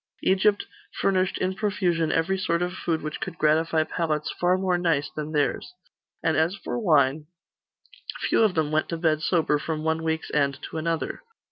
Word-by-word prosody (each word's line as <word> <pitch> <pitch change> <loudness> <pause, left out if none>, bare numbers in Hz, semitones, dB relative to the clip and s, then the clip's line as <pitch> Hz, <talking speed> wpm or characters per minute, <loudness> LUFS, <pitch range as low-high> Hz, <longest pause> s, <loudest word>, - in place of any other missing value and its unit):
Egypt 200 +2 +3 0.3
furnished 185 -1 +1
in 185 +1 -1
profusion 185 -5 0
every 165 +4 +1
sort 175 -2 0
of 180 0 -3
food 165 -4 -2
which 155 0 -4
could 180 -4 -5
gratify 160 +1 +2
palates 155 -2 -2
far 180 +1 +1
more 185 -1 +1
nice 165 -5 0
than 155 0 -5
theirs. 150 +3 -1 0.5
And 160 -1 +2
as 160 +4 +2
for 200 - -4
wine 150 - +2 0.9
few - - +2
of 215 -4 +3
them 155 -2 0
went 155 0 0
to 165 - -2
bed 160 -2 +1
sober 160 -3 +1
from 155 0 -3
one 160 0 0
week's 160 0 -2
end 140 -2 +1
to - - -5
another. 165 0 -2
165 Hz, 175 wpm, -25 LUFS, 155-185 Hz, 0.9 s, Egypt